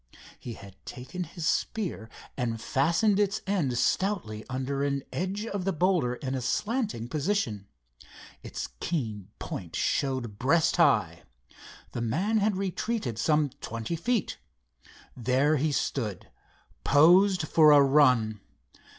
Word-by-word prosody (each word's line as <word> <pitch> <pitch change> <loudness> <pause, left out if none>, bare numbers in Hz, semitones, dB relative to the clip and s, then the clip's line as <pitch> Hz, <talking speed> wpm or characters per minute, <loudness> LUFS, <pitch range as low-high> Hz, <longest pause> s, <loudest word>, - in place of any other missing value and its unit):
He 120 - -7
had 100 -2 -14
taken 155 +9 -6
his 170 0 -7
spear 175 - -2 0.3
and 115 -3 -2
fastened 165 - +2
its 205 +1 0
end 170 -11 0
stoutly 170 - 0
under 135 +2 -2
an 140 -1 -1
edge 195 +4 -2
of 200 -4 -3
the 195 - 0
boulder 170 -8 +1
in 130 +1 -4
a 130 - -2
slanting 205 - -1
position. 140 - -2 0.7
Its - - -6
keen 110 - -3
point 85 -3 -6
showed 130 -7 -1
breast 160 +6 +2
high. - - +3 0.7
The 120 - -4
man 180 - 0
had 205 0 +1
retreated 190 - -2
some 150 +2 +2
twenty 115 +8 -4
feet. 230 +6 -1 0.8
There 130 +5 +2
he 150 +3 0
stood 110 -8 -3 0.5
posed 175 +4 +5
for 155 -1 +6
a 145 - +8
run. 125 -7 +3
145 Hz, 125 wpm, -28 LUFS, 120-190 Hz, 0.8 s, a